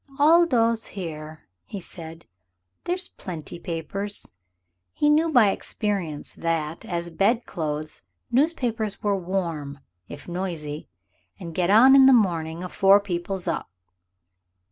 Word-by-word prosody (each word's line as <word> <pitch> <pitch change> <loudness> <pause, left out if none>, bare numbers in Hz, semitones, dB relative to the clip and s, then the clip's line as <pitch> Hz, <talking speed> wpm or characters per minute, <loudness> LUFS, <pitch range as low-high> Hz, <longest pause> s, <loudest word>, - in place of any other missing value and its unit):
"I'll 330 +4 +6
doss 230 -4 +2
here," 155 -4 -7 0.2
he 200 - -7
said; 165 -2 -10 0.6
"there's 360 +1 -1
plenty 170 -3 -7
papers" 190 +5 -5 0.6
he 295 - +2
knew 315 +2 +3
by 230 -8 +5
experience 195 -9 -3
that, 165 -1 -2
as 170 -1 -4
bed 225 +8 +1
clothes, 155 -3 -4 0.3
newspapers 240 -7 0
are 205 -1 +2
warm, 170 -6 -3 0.3
if - - -10
noisy 170 -5 -5 0.5
"and 170 -1 -7
get 175 +1 0
on 245 +6 +7
in 265 -1 +8
the 270 - +7
morning 170 -6 +1
afore 195 +2 +4
people's 185 -1 -2
up." 165 - -2
185 Hz, 120 wpm, -24 LUFS, 165-225 Hz, 0.6 s, in